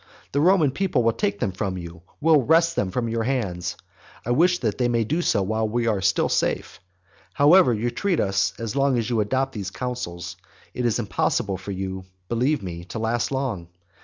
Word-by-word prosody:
The 140 - +1
Roman 170 -4 +4
people 165 -6 0
will 115 0 +3
take 100 -1 -1
them 95 - 0
from 95 0 -3
you, 85 -1 -9 0.2
will 155 -1 +5
wrest 165 +5 +3
them 95 - 0
from 115 +4 -2
your 115 0 -1
hands, 95 -8 -2 0.5
I 120 - -1
wish 175 +8 +4
that 110 -1 -1
they 125 - +2
may 115 -1 +1
do 155 +10 -1
so 100 - +1
while 110 +2 -1
we 120 +1 0
are 105 -4 +1
still 95 - +2
safe. - - -1
But 90 -1 -40 0.3
however 155 +1 +6
you 120 +1 -1
treat 190 +1 0
us, 95 0 +1
as 115 -2 -4
long 140 -2 +2
as 115 +1 -2
you 115 - +1
adopt 130 +5 -1
those 100 -4 -4
counsels, 90 -8 -5 0.4
it 125 -1 0
is 115 - +1
impossible 100 -1 -1
for 95 +2 -10
you, 95 -1 -4 0.2
believe 125 +3 +1
me, 85 -2 -6
to 90 - -7
last 115 +3 -1
long. 130 -11 -2
115 Hz, 205 wpm, -24 LUFS, 95-135 Hz, 0.5 s, however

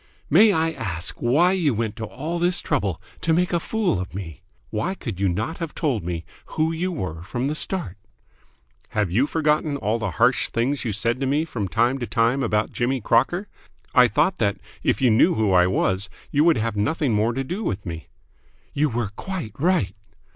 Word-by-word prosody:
"May 205 +8 +7
I 160 -3 +1
ask 85 - -3
why 150 +10 +3
you 165 -9 +1
went 110 -1 -2
to 110 - -4
all 155 +9 -4
this 175 +1 +2
trouble 100 - -1 0.2
to 165 - +2
make 180 +2 +1
a 170 - +3
fool 205 - 0
of 90 -1 -6
me? 80 -8 -7 0.3
Why 145 - -1
could 110 - -6
you 100 -1 +2
not 110 - -3
have 165 -3 -5
told 130 - 0
me 85 -1 -4 0.3
who 160 +1 +2
you 175 +3 -2
were 90 - -4
from 120 +8 -3
the 145 - -1
start?" 155 - -2 1.0
"Have 105 -5 +1
you 125 +10 +2
forgotten 150 -2 +1
all 110 -2 -1
the 110 -3 -2
harsh - - +3
things 130 +5 -1
you 115 - -1
said 115 +5 -1
to 135 - -1
me 145 +4 +1
from 110 -11 -3
time 120 +7 +1
to 120 - -3
time 115 +4 +2
about 110 -3 0
Jimmy 130 +2 0
Crocker? 135 - +1 0.5
I 125 -2 +7
thought 160 +8 +1
that, 100 -2 +1 0.2
if - - 0
you 125 - +5
knew 125 +11 +4
who 110 -3 +1
I 90 -1 +5
was, 95 +1 0 0.2
you 145 +1 +3
would 170 -5 +5
have 110 -1 -1
nothing 130 +5 0
more 110 +3 +2
to 135 - -2
do 180 +11 -4
with 95 - -3
me." 80 -2 -6 0.7
"You 150 +1 +2
were 115 -4 -2
quite 180 - -5
right." 160 - +2
125 Hz, 205 wpm, -23 LUFS, 105-160 Hz, 1.0 s, May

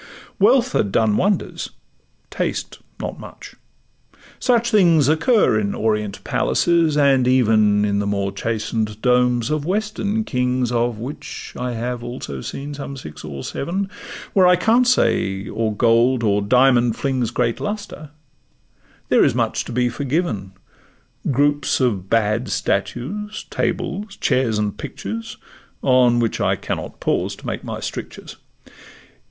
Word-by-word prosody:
Wealth 245 +5 +4
had 100 - 0
done 110 -1 +2
wonders—taste 200 - -4 0.2
not - - -5
much; - - -11 0.9
such 240 -1 +2
things 170 -9 +5
Occur 160 - +3
in 100 -1 -2
Orient 105 -2 -1
palaces, 170 -3 +2
and 135 -3 +4
even 110 -5 +3
In 100 -1 0
the 100 - -1
more 100 -1 -1
chasten'd 110 +1 -2
domes 125 0 +2
of 155 -1 0
Western 210 +3 -1
kings 125 - 0
(Of 120 -1 0
which 125 +7 -7
I 125 0 -3
have 120 +1 -4
also 120 - -6
seen 140 - -6
some 140 -1 -7
six 75 -12 -9
or 70 -3 -7
seven), 190 +7 -3 0.4
Where 185 -2 +5
I 180 - +6
can't 230 +7 +3
say 95 - +1
or 110 -1 -2
gold 120 +3 +3
or 105 -1 +2
diamond 125 +1 +4
flings 130 -4 -1
Great 120 0 -1
lustre, 205 -7 -5 1.0
there - - +5
is - - +2
much - - 0
to - - -7
be 125 +1 +1
forgiven; 125 - -2 0.8
Groups 145 +1 +2
of 100 -8 0
bad 115 +2 +1
statues, 210 - -2
tables, 195 +2 -2
chairs, 120 -4 +1
and 105 -1 -1
pictures, 115 +3 -6 0.5
On 125 -2 +4
which 115 -2 -1
I - - +2
cannot - - -5
pause - - -1
to - - -15
make - - -4
my - - -5
strictures. - - -7
125 Hz, 135 wpm, -21 LUFS, 110-155 Hz, 1.0 s, I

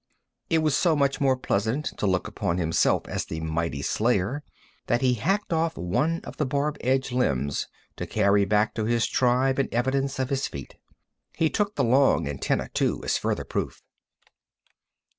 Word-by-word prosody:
It 160 -1 +2
was 155 -3 +2
so 170 0 +3
much 140 -1 +1
more 135 -2 +3
pleasant 115 +4 -1
to 105 - +1
look 95 +1 +1
upon 100 -4 -2
himself 80 -2 +1
as - - -2
the 80 - -5
mighty 80 -3 -2
slayer 115 +4 0 0.5
that 120 0 +1
he 130 -1 +3
hacked 195 - 0
off 165 0 0
one 150 - 0
of - - -9
the 150 - 0
barb 145 +3 -1
edged 130 +1 +1
limbs 70 - 0 0.3
to - - -4
carry 100 0 +3
back 105 +2 +2
to 110 - -2
his 115 0 +2
tribe 130 +3 +2
in 135 - +1
evidence 135 +3 0
of 130 +1 -2
his 135 0 0
feat. 70 -3 -8 0.6
He 160 -1 +1
took 210 -1 -1
the - - +1
long 130 - +4
antennæ, 70 -2 -2
too, - - 0
as - - 0
further - - -1
proof. - - -4
125 Hz, 175 wpm, -26 LUFS, 100-140 Hz, 0.6 s, long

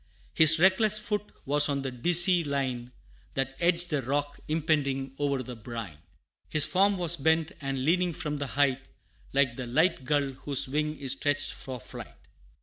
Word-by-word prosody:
His 160 0 +7
reckless 195 +5 +3
foot 210 -1 -4
was 145 +2 +3
on 140 -1 -2
the 135 - -3
dizzy 175 +7 +4
line 130 -4 -3 0.4
That 135 0 -2
edged 175 0 +1
the 150 -2 0
rock, 145 +3 -3
impending 145 -4 -1
o'er 140 -2 -1
the 125 0 -8
brine; 110 -8 -8 0.5
His 155 -1 +4
form 195 +1 +2
was 175 -1 +1
bent, 160 +3 +1
and 135 -1 -3
leaning 180 +2 +2
from 150 -1 -4
the 140 -1 -4
height, 135 -2 +1 0.5
Like 135 -3 +1
the 125 -2 -5
light 155 +3 +1
gull 140 0 0
whose 135 +1 -2
wing 150 +2 -2
is 135 -2 0
stretched 145 +1 0
for 130 -2 -8
flight. - - -10
145 Hz, 165 wpm, -27 LUFS, 135-165 Hz, 0.5 s, His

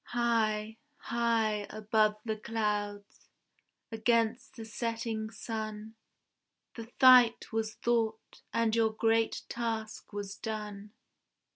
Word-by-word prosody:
High, 225 -2 0 0.2
high, 225 -3 0
above 215 0 +1
the 220 -1 -1
clouds, 210 -2 -3 0.6
against 230 +1 0
the 225 -3 -8
setting 225 -1 -3
sun, 220 -1 -6 0.8
The 230 -1 -9
fight 250 -3 +7
was 220 -1 -2
fought, 225 -2 -1
and 230 -1 +1
your 225 -1 +3
great 225 0 +1
task 225 -2 -4
was 200 -1 -5
done. 210 -1 -6
220 Hz, 100 wpm, -31 LUFS, 215-230 Hz, 0.8 s, fight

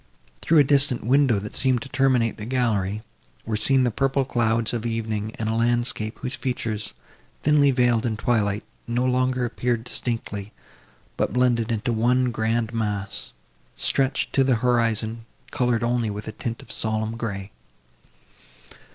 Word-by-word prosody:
Through 165 - +3
a 145 - +8
distant 140 -2 +2
window, 130 -2 +4
that 105 +1 -6
seemed 130 -3 +1
to 135 - -10
terminate 130 -4 +2
the 105 - -6
gallery, 110 -5 0 0.4
were 110 - -1
seen 130 +5 +3
the 120 - +2
purple 135 +3 +1
clouds 115 -2 +1
of 115 -2 -2
evening 110 -2 -2
and 110 - -3
a 110 - 0
landscape, 120 -1 0
whose 125 - -3
features, 115 - -3 0.5
thinly 150 -1 +5
veiled 120 -3 +2
in 110 -2 -2
twilight, 105 -3 0 0.2
no 120 +2 0
longer 130 0 +1
appeared 120 -1 -1
distinctly, 115 -4 -3 0.6
but, - - 0
blended 120 -2 +2
into 115 +2 -1
one 125 +3 +2
grand 115 +1 -1
mass, 105 -3 -2 0.4
stretched 135 0 0
to 135 - +4
the 130 -2 +3
horizon, 115 -1 0 0.2
coloured 125 -2 +1
only 120 -1 +1
with 105 +1 -6
a - - -3
tint 115 +2 -5
of 115 - -10
solemn 110 0 -2
grey. 100 -4 -5
115 Hz, 150 wpm, -24 LUFS, 110-125 Hz, 0.6 s, a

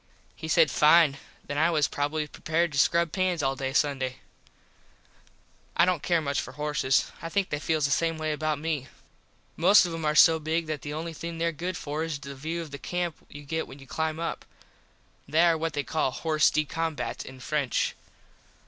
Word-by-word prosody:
He 160 - -7
said, 160 -1 +4
Fine, 150 -2 +5 0.3
then 145 0 -3
I 160 +2 +4
was 155 -4 +2
probably 150 +2 -2
prepared 160 +3 -1
to 140 - -1
scrub 170 +2 +3
pans 185 -4 0
all 135 0 +1
day 135 0 -3
Sunday. 135 -2 0 1.6
I 170 - +6
dont 180 -4 0
care 170 -2 +1
much 140 -3 -1
for 130 - -9
horses. 150 -2 0
I 165 - -5
think 195 +2 -1
they 150 - -1
feels 155 -1 0
the 140 - 0
same 165 +2 +1
way 155 0 -2
about 155 0 -1
me. 150 -3 -3 0.7
Most 185 +4 +6
of 175 - -4
them 165 -1 -5
are 150 0 +1
so 160 +1 +7
big 160 +2 -1
that 155 -3 -4
the 145 - -6
only 165 +1 -4
thing 165 +1 -6
there 170 0 0
good 175 +3 -4
for 150 +2 -3
is 165 -3 -3
the 140 0 -8
view 160 +5 -4
of 155 - -11
the 140 - -7
camp 175 -1 -2
you 145 0 -10
get 160 +3 -3
when 135 - -11
you 135 - -13
climb 160 +3 -2
up. 165 - -3 0.8
They 155 +4 +3
are 170 -1 +5
what 160 0 -2
they 145 -1 -1
call 155 -3 0
hors 155 -2 +4
de 155 - 0
combat 145 -7 -3
in 130 -1 -11
French. 140 -1 -1
155 Hz, 205 wpm, -27 LUFS, 145-165 Hz, 1.6 s, so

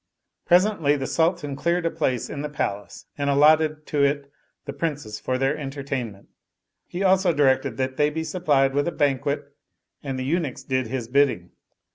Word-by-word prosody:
Presently 175 -5 +3
the 135 -2 -3
Sultan 160 -2 0
cleared 170 +4 0
a 165 - +1
place 125 -3 -1
in 140 - -6
the 150 - -4
Palace 105 -8 -4
and 140 0 0
allotted 155 +2 +4
to 145 -2 0
it 140 0 0 0.3
the - - -5
Princes 145 -10 -4
for 130 - -2
their 135 +3 +1
entertainment: 135 -7 -5 0.6
he 180 +3 -4
also 190 -1 +4
directed 135 -4 +2
they 130 +3 +1
be 160 +2 -3
supplied 145 -7 +1
with 145 +3 +1
a - - 0
banquet 145 0 -1 0.5
and 135 -2 -4
the 130 - -3
eunuchs 155 -2 -2
did 130 -2 -1
his 125 -1 -4
bidding. 125 -9 +1
140 Hz, 165 wpm, -24 LUFS, 130-155 Hz, 0.6 s, allotted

